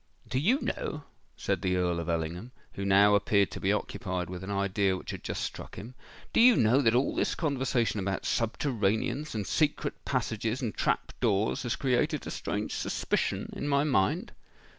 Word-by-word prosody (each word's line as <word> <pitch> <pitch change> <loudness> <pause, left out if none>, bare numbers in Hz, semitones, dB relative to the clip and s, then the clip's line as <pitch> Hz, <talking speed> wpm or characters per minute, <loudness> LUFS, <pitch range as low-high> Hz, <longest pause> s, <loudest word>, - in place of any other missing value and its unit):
"Do 130 - 0
you 230 - +3
know," 150 -1 -3 0.3
said - - -1
the 90 0 +1
Earl 90 -2 +1
of 85 0 -4
Ellingham, 85 +7 -2 0.2
who 100 - -5
now 100 +1 +5
appeared 100 0 +3
to - - -6
be 95 - +1
occupied 95 -4 -2
with 90 0 -6
an 95 - -6
idea 100 -1 +1
which - - -7
had - - -7
just - - -3
struck - - -6
him,—"do 120 - -4
you 245 0 +8
know 120 - +4
that 115 -3 +3
all 130 +3 +2
this - - 0
conversation 130 -7 0
about 95 0 -2
subterraneans, 120 +3 0
and 105 -2 -2
secret 150 +6 0
passages, 115 -2 -1
and 120 -6 -2
trap - - -1
doors, 100 +2 +1
has 120 -3 -1
created 125 -3 0
a - - -5
strange - - -3
suspicion - - -1
in 145 - -3
my 140 0 +3
mind?" 150 - +1
110 Hz, 180 wpm, -29 LUFS, 95-135 Hz, 0.3 s, you